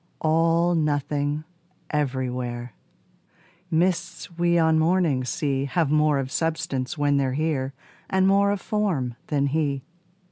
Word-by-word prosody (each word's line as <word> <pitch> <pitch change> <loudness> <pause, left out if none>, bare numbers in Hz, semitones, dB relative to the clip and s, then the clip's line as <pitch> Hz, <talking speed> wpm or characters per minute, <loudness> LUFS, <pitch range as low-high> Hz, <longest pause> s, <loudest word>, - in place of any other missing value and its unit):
All 165 +2 +3
nothing 145 -1 0 0.5
everywhere: 125 -4 -2 1.0
Mists 170 0 -1
we 170 0 +2
on 160 -1 +4
mornings 160 -7 +2
see 140 -2 -1
Have 155 0 0
more 150 -1 +3
of 135 -1 -3
substance 155 -5 -2
when 145 -1 +2
they're 135 -2 +1
here 140 -3 -1 0.3
And 190 0 +2
more 200 +1 +4
of 200 -1 0
form 185 - -1
than 140 -2 +1
he. 140 -2 -1
150 Hz, 120 wpm, -24 LUFS, 135-165 Hz, 1.0 s, on